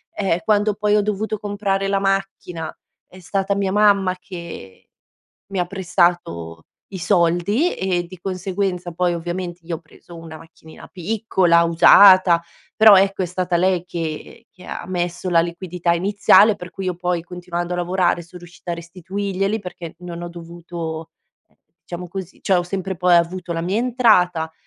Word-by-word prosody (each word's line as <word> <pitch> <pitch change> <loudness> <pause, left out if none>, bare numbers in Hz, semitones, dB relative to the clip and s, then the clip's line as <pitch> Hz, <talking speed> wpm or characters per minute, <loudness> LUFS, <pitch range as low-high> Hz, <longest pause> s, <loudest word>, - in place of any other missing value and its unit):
Ehm, 190 -4 0
quando 210 0 +2
poi 210 0 +1
ho 210 - +4
dovuto 210 +1 -2
comprare 200 -1 -2
la 195 0 +1
macchina, 195 -4 -3 0.3
è 185 - -15
stata 195 +3 -1
mia 195 -1 -1
mamma 200 -2 +3
che 170 - -10 0.6
mi 195 - -4
ha 175 - 0
prestato 175 - -1 0.3
i 190 - -7
soldi, 180 - +1
e 180 -2 -1
di 185 +1 -12
conseguenza 185 -1 -3
poi 175 +1 0
ovviamente 175 +1 -5
io 165 0 -3
ho - - -13
preso 170 +1 -16
una 165 -1 -10
macchinina 160 -1 -15
piccola, 185 -3 +1
usata, 175 +1 +7 0.3
però 215 -2 +8
ecco 195 0 +2
è - - -1
stata 180 0 -1
lei 180 0 +1
che 165 -3 -6
che 185 -4 -17
ha - - -6
messo 175 0 -3
la 170 -1 +5
liquidità 175 0 -2
iniziale 200 +4 +4
per 180 -2 -9
cui 190 +2 -7
io 180 - -2
poi 175 -1 -1
continuando 175 0 -5
a - - -3
lavorare, 175 0 0
son 170 +2 -13
riuscita 175 0 -8
a - - -1
restituirglieli, 190 +4 -3
perché 175 -3 -8
non 175 -1 -8
ho 175 - -5
dovuto, 170 -1 -7 0.4
ehm, - - -36 0.2
diciamo 175 0 -8
così 190 0 -8
cioè 195 - +2
ho 175 - +1
sempre 190 +1 -4
poi 180 +1 +3
avuto 170 +1 0
la 165 - -2
mia 185 +4 -1
entrata, 210 -10 +2
180 Hz, 165 wpm, -20 LUFS, 170-195 Hz, 0.6 s, però